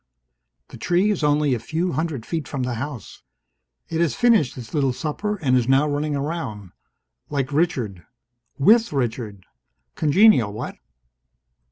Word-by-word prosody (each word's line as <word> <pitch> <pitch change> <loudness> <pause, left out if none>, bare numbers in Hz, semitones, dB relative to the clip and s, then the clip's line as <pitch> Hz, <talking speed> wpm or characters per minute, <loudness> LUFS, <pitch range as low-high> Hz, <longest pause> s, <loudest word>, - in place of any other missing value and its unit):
The - - -11
tree 180 - +2
is 185 -6 -2
only 145 -1 +2
a 120 - -1
few 160 +10 -2
hundred 155 -7 -3
feet 160 -3 -3
from 135 -3 -3
the 125 0 -2
house. 125 -2 -7 0.7
It 165 0 -2
has 170 - +1
finished 225 - +3
its 120 -3 -9
little 135 -4 +1
supper 170 +9 -3
and 130 -2 +3
is 125 -2 +2
now 135 +3 +4
running 145 0 -1
around. 140 - -4 0.6
Like 140 -2 -2
Richard. 125 - -1 0.5
With 225 +11 +4
Richard! 115 -7 -3 0.5
Congenial, 155 - +4
what? 105 - -6
145 Hz, 145 wpm, -22 LUFS, 125-165 Hz, 0.7 s, now